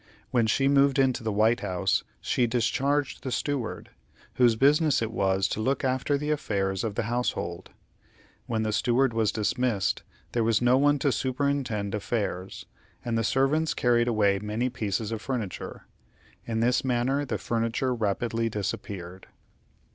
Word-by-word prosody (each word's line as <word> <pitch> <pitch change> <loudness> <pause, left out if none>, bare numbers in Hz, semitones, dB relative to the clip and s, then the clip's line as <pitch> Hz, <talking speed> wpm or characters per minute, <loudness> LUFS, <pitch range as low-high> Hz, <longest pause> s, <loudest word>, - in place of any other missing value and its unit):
When 120 -3 +2
she 135 +5 +2
moved 140 0 +4
into 130 -3 +2
the 110 - -1
White 110 +4 +3
House, 95 -1 0 0.2
she 120 - +1
discharged 135 +4 0
the 130 - -4
Steward, 135 -4 -3 0.4
whose 120 -3 +4
business 145 +3 +4
it 115 -1 -2
was 95 -3 +1
to - - -3
look 135 +4 0
after 130 +2 +1
the 150 +1 -2
affairs 100 -9 -1
of 110 -3 -3
the - - 0
household. 110 -7 -2 0.8
When 110 -2 -1
the 110 -1 -1
Steward 120 +3 +2
was 110 -2 +1
dismissed, 110 -2 0 0.3
there 120 - +1
was 110 -1 +3
no 125 +1 +4
one 145 +2 +4
to 140 0 +1
superintend 130 -6 -1
affairs, 100 -3 -3 0.4
and 120 -1 -1
the 115 - +1
servants 140 +7 +1
carried 120 -1 +2
away 100 -4 +2
many 105 +5 -2
pieces 110 -2 -2
of 110 -1 -3
furniture. 115 -9 -5 0.6
In 115 -1 -1
this 125 +2 +2
manner 130 +2 +1
the 140 - -2
furniture 115 +2 -1
rapidly 115 +1 -1
disappeared. 95 -3 -5
120 Hz, 155 wpm, -27 LUFS, 105-130 Hz, 0.8 s, moved